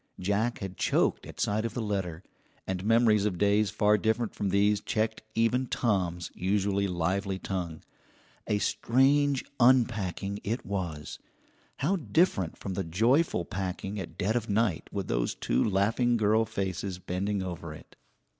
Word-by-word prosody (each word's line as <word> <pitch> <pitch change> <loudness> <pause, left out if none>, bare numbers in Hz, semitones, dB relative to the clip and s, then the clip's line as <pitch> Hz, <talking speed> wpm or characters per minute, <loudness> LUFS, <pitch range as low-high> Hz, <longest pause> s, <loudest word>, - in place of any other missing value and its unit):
Jack 105 +5 0
had 95 -2 -6
choked - - +1
at - - -11
sight 105 +1 +1
of 115 - -4
the - - -2
letter, 95 -5 -3 0.4
and 95 -1 -3
memories 110 -1 +4
of 95 -4 -1
days 100 +2 +3
far 105 0 +3
different 110 +2 0
from 100 - -2
these 100 +2 +3
checked 110 0 -1
even 120 +3 +2
Tom's 90 -8 -1
usually 100 +1 0
lively 95 +2 -1
tongue. 90 -4 -4 0.6
A 105 - +1
strange 135 +6 +2
unpacking 110 -6 +2
it 115 +5 -3
was; 85 -7 -4 0.6
how 185 +8 +1
different 155 - +1
from 95 - -5
the 95 - -2
joyful 110 - +2
packing 95 +1 -4
at 95 - -7
dead 105 +5 0
of 115 -2 -1
night 105 -5 0
with 100 -2 -3
those - - 0
two 60 +2 +1
laughing 115 +5 +2
girl 110 +1 +3
faces 95 -2 -3
bending 95 +2 -2
over 85 -3 -6
it! 75 - -13
100 Hz, 150 wpm, -29 LUFS, 95-115 Hz, 0.6 s, memories